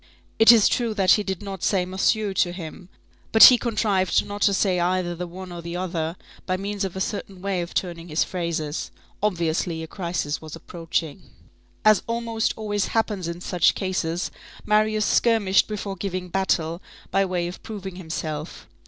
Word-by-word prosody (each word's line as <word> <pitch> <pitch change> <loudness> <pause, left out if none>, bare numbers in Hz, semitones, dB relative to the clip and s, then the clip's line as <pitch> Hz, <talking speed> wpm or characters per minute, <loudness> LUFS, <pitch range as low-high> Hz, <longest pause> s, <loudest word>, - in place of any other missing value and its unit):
It 225 +1 +9
is 225 -3 +6
true 235 -3 0
that 190 -3 +3
he 210 - +5
did 190 -2 -4
not 195 -3 -6
say 190 -3 +1
"monsieur" 195 +2 0
to 180 -2 +2
him; 175 0 -9 0.4
but 220 - +8
he 250 - +11
contrived 210 -5 +1
not 205 0 -7
to 200 - +5
say 185 -2 +2
either 175 0 0
the 175 +1 -5
one 185 +1 -9
or 175 -1 -7
the 170 +1 -6
other, 170 -2 -2 0.3
by 185 0 0
means 200 +1 -3
of 190 -2 -3
a - - -3
certain 195 -1 -4
way 190 -1 -1
of 170 - -7
turning 170 -2 -2
his 155 0 +1
phrases. 170 -4 -3 0.3
Obviously, 170 -4 0
a - - -7
crisis 170 -4 -3
was 155 -1 -8
approaching. 165 0 -4 0.6
As 215 -1 +6
almost 230 -1 -1
always 205 -2 -1
happens 210 -5 -1
in 170 +1 -5
such 180 -1 +2
cases, 180 -2 -2 0.3
Marius 215 0 +2
skirmished 210 -5 +3
before 205 -2 -4
giving 185 -2 -4
battle, 170 -2 0 0.3
by 195 - +3
way 180 -2 -1
of 175 - -8
proving 195 -4 -7
himself. 160 -3 -5
185 Hz, 175 wpm, -24 LUFS, 170-205 Hz, 0.6 s, he